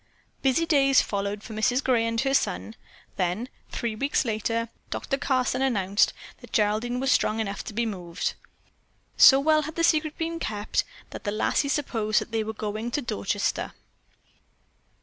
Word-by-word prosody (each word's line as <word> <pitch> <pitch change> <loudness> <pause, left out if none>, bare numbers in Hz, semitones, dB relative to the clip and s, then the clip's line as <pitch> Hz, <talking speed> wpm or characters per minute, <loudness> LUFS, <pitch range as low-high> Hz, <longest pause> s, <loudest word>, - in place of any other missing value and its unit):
Busy 270 +5 +2
days 275 -4 +4
followed 200 0 -3
for 220 - -8
Mrs. 245 +5 +1
Gray 235 -3 +2
and 230 0 -1
her 270 0 0
son. 225 - 0 0.4
Then, 185 +7 -1 0.2
three 235 -2 -3
weeks 275 +6 0
later, 230 +1 -1 0.2
Doctor - - -2
Carson 265 -2 0
announced 205 -6 +2 0.3
that - - -14
Geraldine 220 +4 +1
was 270 +1 +1
strong 215 +1 +2
enough 200 -2 -3
to - - -6
be 235 +1 +1
moved. 180 -6 -3 0.8
So 270 - +8
well 310 +2 +3
had 310 +1 -6
the 335 - 0
secret 310 -1 +2
been 330 0 -3
kept 210 -5 -1 0.3
that - - -8
the 205 - -2
lassie 220 +6 +1
supposed 225 -7 +1
that - - -7
they 225 -1 0
were 220 - -4
going 215 +1 -4
to 290 +5 -1
Dorchester. 100 - -2
230 Hz, 165 wpm, -26 LUFS, 215-275 Hz, 0.8 s, So